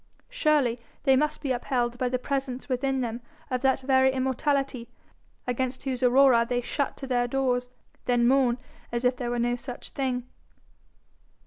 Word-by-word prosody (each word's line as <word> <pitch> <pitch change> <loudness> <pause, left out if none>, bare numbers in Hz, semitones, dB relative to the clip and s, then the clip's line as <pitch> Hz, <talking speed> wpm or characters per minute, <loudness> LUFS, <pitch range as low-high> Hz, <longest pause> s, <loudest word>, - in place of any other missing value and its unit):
Surely 295 - +2 0.2
they 270 -2 +5
must 300 +3 0
be 275 - -1
upheld 245 -1 -1
by 255 - +1
the 255 - 0
presence 265 0 -3
within 265 0 0
them 235 0 -3 0.3
of 250 -1 0
that 265 0 +2
very 265 0 +4
immortality, 265 -1 -1 0.6
against 255 +1 -2
whose 260 -2 -2
aurora 255 -1 +6
they 245 +1 -1
shut 275 +3 -2
to 270 - -6
their 245 -2 +1
doors, 250 -1 0 0.4
then 240 -1 +3
mourn 255 -2 +3 0.3
as 235 +1 -1
if 250 +1 +3
there 245 -1 -3
were 240 - -1
no 240 +1 +1
such 245 0 -8
thing. 255 -3 -2
255 Hz, 160 wpm, -27 LUFS, 245-270 Hz, 0.6 s, aurora